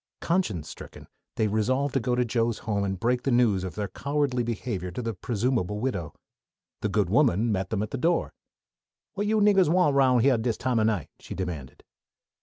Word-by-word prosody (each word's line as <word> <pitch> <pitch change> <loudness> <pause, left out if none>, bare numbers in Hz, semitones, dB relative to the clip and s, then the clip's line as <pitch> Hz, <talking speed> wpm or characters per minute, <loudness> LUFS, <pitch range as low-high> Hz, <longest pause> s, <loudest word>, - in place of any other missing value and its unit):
Conscience 110 - -1
stricken, - - -10 0.3
they 110 - +1
resolved 130 +7 0
to 135 - +2
go 125 +1 0
to 125 0 +1
Joe's 115 -1 0
home 105 -3 0
and 95 -2 -2
break 120 +3 +1
the 135 - -1
news 120 -7 +3
of 95 - -5
their 105 -1 -2
cowardly 140 0 -1
behavior 115 -5 -3
to 90 - -5
the 115 0 -2
presumable 105 -1 -1
widow. 100 - -3 0.7
The 105 - 0
good 100 -2 +1
woman 115 - +3
met 95 -2 -1
them 105 -2 -1
at 105 - -6
the 135 - -3
door. 170 +6 +1 0.8
"What 205 0 -2
yo' 220 0 +2
niggahs 200 -5 +4
want 175 -3 +3
round 130 -3 +4
here 130 -3 +4
dis 115 0 -1
time 125 -2 0
o' - - +3
night?" 105 -9 0
she - - -8
demanded. 85 -8 -6
115 Hz, 200 wpm, -26 LUFS, 100-130 Hz, 0.8 s, niggahs